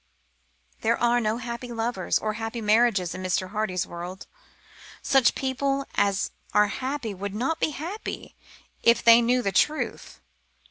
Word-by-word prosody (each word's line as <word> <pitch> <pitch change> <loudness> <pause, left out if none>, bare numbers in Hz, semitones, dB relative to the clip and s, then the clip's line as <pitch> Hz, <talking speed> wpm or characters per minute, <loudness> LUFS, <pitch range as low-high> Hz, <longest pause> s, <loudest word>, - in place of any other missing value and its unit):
There 230 +1 +1
are 240 0 +2
no 220 0 0
happy 240 0 -6
lovers 225 -4 -1
or 215 0 -2
happy 225 +2 -4
marriages 215 -4 +2
in 185 - -6
Mr. 185 0 -1
Hardy's 200 -4 -1
world. 175 +2 -8 0.8
Such 270 -3 +4
people 275 +1 -1
as 200 -1 +1 0.2
are 210 0 +5
happy 255 -2 -3
would 200 +1 -5
not 270 +9 -1
be - - +1
happy 330 +9 -6 0.5
if 235 0 +4
only - - -22
they 230 0 +8
knew 250 +2 +2
the 195 - 0
truth. 300 +11 -1
230 Hz, 150 wpm, -25 LUFS, 200-250 Hz, 0.8 s, they